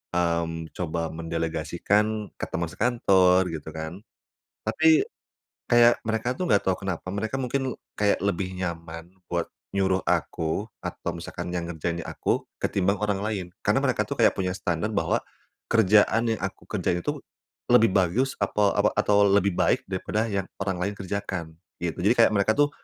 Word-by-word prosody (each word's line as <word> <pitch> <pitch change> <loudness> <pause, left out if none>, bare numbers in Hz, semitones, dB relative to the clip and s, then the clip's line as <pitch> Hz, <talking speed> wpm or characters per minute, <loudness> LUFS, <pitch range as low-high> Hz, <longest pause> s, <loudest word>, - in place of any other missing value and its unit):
mmm, 85 -2 -1
coba 85 -2 -2
mendelegasikan 85 +6 -1
ke - - -1
temen 85 -3 -2
sekantor 95 -6 +3
gitu 80 -1 -6
kan. 80 +4 -6 0.7
Tapi 325 +5 +4 0.6
kayak 120 0 +6
mereka 110 +2 0
tuh, 185 - -1
enggak 100 - +4
tahu 95 -1 +2
kenapa, 90 -3 -3
mereka 110 +5 -2
mungkin 130 0 -1 0.3
kayak 105 -1 +3
lebih 95 -1 -1
nyaman 85 -1 -5 0.2
buat 85 -1 0 0.3
nyuruh 95 -1 +2
aku 80 +5 0 0.2
atau 85 - -4
misalkan 85 - -6
yang 85 -1 -3
ngerjainnya 85 +1 -3
aku, - - 0 0.2
ketimbang 100 +1 +1
orang 105 -2 0
lain. 105 -4 -2 0.2
Karena - - +3
mereka - - +2
tuh - - -4
kayak - - +5
punya 90 -1 0
standard 90 +2 -1
bahwa - - +1 0.5
kerjaan 110 +1 +4
yang 110 - -6
aku 95 +1 -5
kerjain 90 -4 0
itu - - -2 0.5
lebih 115 -4 +6
bagus 105 +8 +2
atau 105 -1 +2
apa - - +3
atau 105 0 +4
lebih 100 -1 +3
baik - - +1
daripada 105 +3 -1
yang 100 -2 -1 0.2
orang 95 -2 -1
lain 100 +3 -1
kerjakan 95 -4 -4 0.3
gitu. 85 -2 -2
Jadi 105 +6 +4
kayak 115 - +6
mereka 100 +2 +3
tuh, 145 0 +4
95 Hz, 160 wpm, -26 LUFS, 85-105 Hz, 0.7 s, kayak